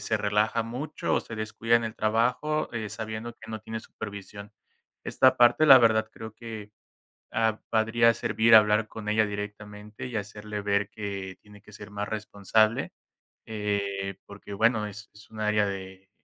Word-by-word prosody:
se 110 +2 0
relaja 105 +2 +1
mucho, 130 +7 -3
o - - +2
se 110 - -9
descuida 110 +2 -1
en 115 - -1
el 110 0 -4
trabajo, 125 +8 0
eh, 110 -2 -4
sabiendo 110 +1 -5
que 110 -1 -12
no 110 - -4
tiene 110 +1 -6
supervisión. 100 -1 -9 0.5
Esta 130 -1 +3
parte, 120 +5 +5
la 135 -4 +10
verdad, 110 -2 +3
creo 110 -1 -9
que, 110 -2 -9 0.6
ah, 110 -1 +1
podría, 115 +1 +3
servir 115 0 +4
hablar 105 0 +5
con 105 -1 -7
ella 110 +1 +3
directamente, 105 +1 -7
y 125 - -7
hacerle 105 0 -5
ver, 100 0 +1
que 100 -3 -6
tiene 105 -1 -17
que - - -17
ser 105 0 -11
más 105 0 -4
responsable, 110 +1 0 0.5
eh, 100 -2 -2
porque 100 0 -11
bueno, 110 +1 +2
es 105 0 -10
es 105 0 -17
un 110 -1 -9
área 105 -1 +2
de 95 -1 -7
110 Hz, 165 wpm, -27 LUFS, 105-110 Hz, 0.6 s, la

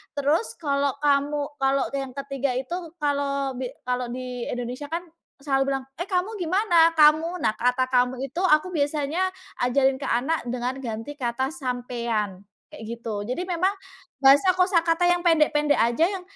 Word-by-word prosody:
Terus 290 +9 0
kalau 280 -2 0
kamu 290 0 0
kalau 270 0 +2
yang 270 -2 -4
ke-3 275 -2 -2
itu, 330 +6 -4
kalau 280 -1 0
bi 255 - -2 0.2
kalau 250 0 -2
di 250 0 -5
Indonesia 245 +4 -4
kan 335 +3 -3 0.4
selalu 270 -1 +1
bilang, 270 - -2 0.2
"Eh 350 - -3
kamu 380 +3 -1
gimana 345 -2 +3
kamu?" 320 +3 +4
Nah 215 - +2
kata 250 +1 +1
kamu 250 0 +1
itu 275 +5 -4
aku 305 +1 +4
biasanya 300 +1 0 0.4
ajarin 265 +1 +2
ke 275 - -6
anak 265 +4 0
dengan 250 +2 -3
ganti 240 +3 -6
kata 255 +2 -1
"sampean" 240 - -3 0.2
kayak - - -11
gitu. 225 -3 -5
Jadi 250 +9 -3
memang 365 +3 +1 0.5
bahasa 285 +7 +6
kosakata 350 -2 +2
yang 355 0 +1
pendek-pendek 300 -3 +3
aja 235 +8 +3
yang 380 +1 -3
280 Hz, 155 wpm, -25 LUFS, 250-325 Hz, 0.5 s, bahasa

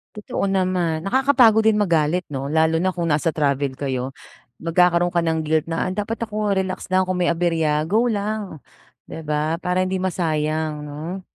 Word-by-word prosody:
Totoo 205 -1 -3
naman, 180 -4 0
nakakapagod 250 -2 +4
din 220 -1 +3
magalit 170 -3 +1
'no, 135 +1 -3
lalo 160 +1 +2
na 185 - +2
kung 175 -2 -3
nasa 155 0 +1
travel 140 -3 -1
kayo. 130 -2 -2 0.5
Magkakaroon 175 +1 +2
ka 170 - +2
ng 160 -1 -1
guilt 160 +1 0
na, 175 +3 -1
"Dapat 225 +3 -3
ako 210 -2 -1
relax 185 0 -3
lang, 185 0 +2
kung 185 -1 -2
may 175 - +2
aberya, 165 -3 +1
go 225 +7 +2
lang!" 210 -4 -3 0.5
'Di 160 - -8
ba? 155 +2 -1
Para 180 +1 0
hindi 185 0 -2
masayang 155 -4 -1
'no? 155 +6 -6
170 Hz, 170 wpm, -22 LUFS, 155-190 Hz, 0.5 s, nakakapagod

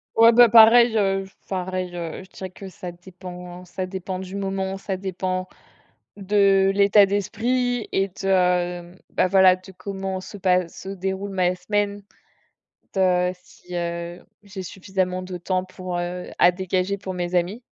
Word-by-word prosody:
Ouais, 230 +1 +7
bah 240 +1 +7
pareil, 230 +1 +7
heu, 195 -2 +1
je - - -15
f - - -33
pareil, 185 -1 -3
heu, 170 0 -5
je 190 - -18
dirais 190 0 -8
que 195 +1 -10
ça 180 0 -8
dépend, 180 0 -10
ça 185 +1 -5
dépend 185 0 -5
du 190 +1 -7
moment, 195 -1 -2
ça 195 0 -4
dépend 185 -1 -3 0.7
de 195 -1 +3
l'état 200 0 +6
d'esprit 235 +5 -1
et 195 0 +1
de, 180 -2 0 0.2
bah, - - +2
voilà, 190 -1 +6
de 185 +1 -14
comment 190 0 -5
se 205 +2 -9
passe, 180 -2 +1
se 190 - -7
déroule 195 +1 -3
ma 185 -2 +1
semaine 205 +2 -1
en 200 - -26 0.7
fait, 195 - -2 0.3
heu, - - -2
si, 180 0 -15
heu, 170 0 -4 0.2
j'ai 195 -1 -8
suffisamment 185 0 -3
de 185 -1 -6
temps 185 +1 -1
pour, 185 -1 -6
heu, 175 +1 -4
à 175 - +7
dégager 185 +1 -1
pour 190 -1 -6
mes 175 0 -3
amis. 180 +7 0
190 Hz, 170 wpm, -23 LUFS, 180-195 Hz, 0.7 s, Ouais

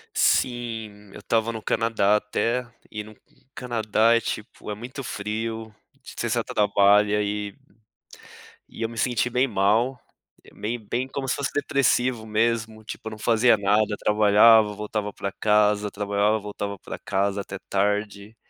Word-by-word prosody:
Sim, 110 -4 0
eu - - -10
estava 115 0 0
no 110 -2 -7
Canadá 110 -3 +2
até 115 +4 -1 0.2
e 105 -1 -5
no 110 +1 -13 0.4
Canadá 115 -1 +2
é - - +2
tipo, 105 -1 -6
é 105 - -2
muito 125 +5 -8
frio, 110 +1 -4 0.3
você - - -5
só - - 0
trabalha 105 0 +3
e 105 0 -3 1.1
e - - -11
eu 115 - -1
me 115 - -10
senti 125 -1 0
bem 125 +2 +2
mal, 115 +5 +1 0.5
meio 115 +3 -4
bem, 125 +2 -1
como 135 0 -5
se 125 - +1
fosse 140 - -2
depressivo 130 -5 +1
mesmo, 110 0 -1
tipo 110 - -8
eu - - -13
não 110 - -9
fazia 115 +2 +4
nada, 105 +1 +2
trabalhava 105 +1 +5
voltava 105 0 -4
pra 100 - -4
casa, 105 0 +2
trabalhava 105 +1 0
voltava 100 -1 -6
pra - - -8
casa 100 +1 -1
até 100 0 -8
tarde 105 +1 -1
110 Hz, 150 wpm, -24 LUFS, 105-115 Hz, 1.1 s, trabalhava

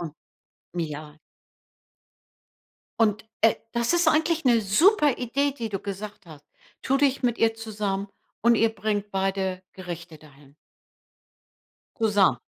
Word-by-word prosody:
Mhm, 165 -4 -5 0.7
ja. 150 -1 -6 1.8
Und, 215 -1 +2 0.2
äh, 225 -1 +5 0.2
das 235 +5 0
ist 345 -2 +4
eigentlich 320 +1 +1
'ne 240 -4 +4
super 295 - +4
Idee, 275 +3 0
die 230 -2 -3
du 195 -2 -3
gesagt 200 0 -7
hast. 155 -4 -13 0.4
Tu 270 - +1
dich 275 -2 +2
mit 240 -1 +1
ihr 225 0 +3
zusammen 205 -3 -3 0.3
und 235 +1 +5
ihr 225 +1 +4
bringt 205 0 -2
beide 190 -1 -1
Gerichte 170 -3 -8
dahin. 145 -2 -19 1.5
Zusammen. 205 - +3
210 Hz, 125 wpm, -25 LUFS, 185-235 Hz, 1.8 s, äh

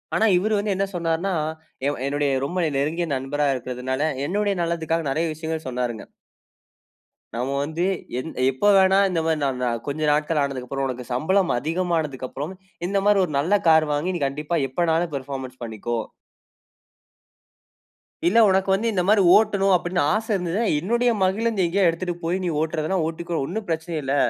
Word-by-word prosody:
ஆனா, 225 - +3
இவரு 215 +4 0
வந்து 205 0 0
என்ன 195 +1 0
சொன்னார்னா, 170 +3 -1 0.5
எ - - +3 0.2
என்னுடைய 145 0 0 0.2
ரொம்ப 175 +6 -4
நீ 160 - +1
நெருங்கிய 160 +5 -1
நண்பரா 140 +3 -1
இருக்குறதனால, 130 +2 -4 0.3
என்னுடைய 205 +3 0
நலத்துக்காக 165 -1 -1
நிறைய 160 +4 0
விஷயங்கள் 160 0 -5
சொன்னார்ங்க. 125 -3 -3 1.3
நாம 130 +3 -2
வந்து 160 +4 -2 0.4
எந் 160 +5 -5 0.2
எப்போ 135 +11 0
வேணா 190 0 +5
இந்த 175 -3 0
மாரி 160 -1 +1
நாம் 135 -3 -1
நா 125 - +1 0.2
கொஞ்சம் 150 +1 0
நாட்கள் 150 +1 +1
ஆனதுக்கப்புறம், 135 0 -3
"உனக்கு 125 -1 -5
சம்பளம் 180 +8 +2
அதிகமானதுக்கப்புறம் 155 -1 -2 0.3
இந்த 200 - 0
மாரி 205 -1 +5
ஒரு 155 - -8
நல்ல 190 +8 +2
கார் 160 -1 +6
வாங்கி, 170 +6 -1
நீ 170 - -4
கண்டிப்பா 150 +5 -2
எப்பனாலும் 165 +3 0
பெர்ஃபார்மன்ஸ் 130 -2 -6
பண்ணிக்கோ" 115 +1 -3 2.3
"இல்ல 215 +6 +4
உனக்கு 190 0 +2
வந்து 220 +4 +1
இந்த 190 -4 +1
மாரி 210 0 +5
ஓட்டணும் 200 -3 +3
அப்படினு 175 -1 0
ஆச 220 +1 -1
இருந்ததுனா, 180 +4 -1 0.2
என்னுடைய 235 +7 +1
மகிழுந்து 210 +1 +1
எங்கேயாவது 180 +1 +3
எடுத்துட்டு 175 +1 -3
போய் 180 +3 -1
நீ 175 - 0
ஓட்றதுனா 160 +3 -1
ஓட்டிக்கோ. 170 +1 -4
ஒன்னும் 210 +8 -4
பிரச்சனையே 160 -1 -2
இல்ல. 135 +1 0
165 Hz, 155 wpm, -23 LUFS, 140-190 Hz, 2.3 s, கார்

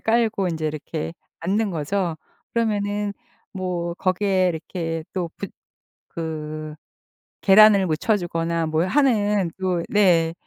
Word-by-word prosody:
깔고 220 -4 +1
인제 160 -2 -2
이렇게 155 +1 -4 0.3
앉는 200 +4 0
거죠. 170 +1 -1 0.4
그러면 205 -2 0 0.4
뭐 175 -3 -3
거기에 185 0 +1
이렇게 165 -1 -4
또 180 -3 -2
붙 200 - -6 0.6
그 155 -2 -5 0.7
계란을 200 -1 +7
묻혀 170 +7 +1
주거나 165 -2 -1
뭘 160 +3 0
하는 210 - +2
또 180 -3 0
네. 170 -5 +4
180 Hz, 210 characters per minute, -23 LUFS, 165-205 Hz, 0.7 s, 계란을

